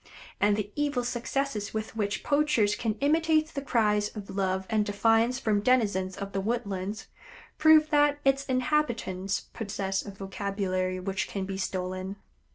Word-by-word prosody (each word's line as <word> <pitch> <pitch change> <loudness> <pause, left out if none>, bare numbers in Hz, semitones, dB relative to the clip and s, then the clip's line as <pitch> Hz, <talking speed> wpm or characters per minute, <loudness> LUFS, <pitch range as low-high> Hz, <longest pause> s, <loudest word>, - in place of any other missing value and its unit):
And 205 0 +3
the 210 -1 -3
evil 290 -4 0
success 240 -2 -2
with 220 +1 -4
which 205 -3 -2
poachers 285 -8 +2
can 220 -3 -1
imitate 315 +1 +3
the 280 - -5
cries 210 -5 +2
of 200 -2 -7
love 190 -1 0
and 215 -1 +2
defiance 225 +4 +2
from 215 -5 +1
denizens 205 -6 +1
of 200 0 -5
the 195 0 -1
woodlands, 205 -2 -3 0.5
proves 310 0 +6
that 290 -1 +4
its 270 0 +3
inhabitants 240 -8 0
possess 195 -3 -2
a - - -8
vocabulary 195 -1 -2
which 190 +1 -2
can 195 -2 -3
be 190 0 -5
stolen. 185 0 -3
210 Hz, 150 wpm, -28 LUFS, 195-255 Hz, 0.5 s, proves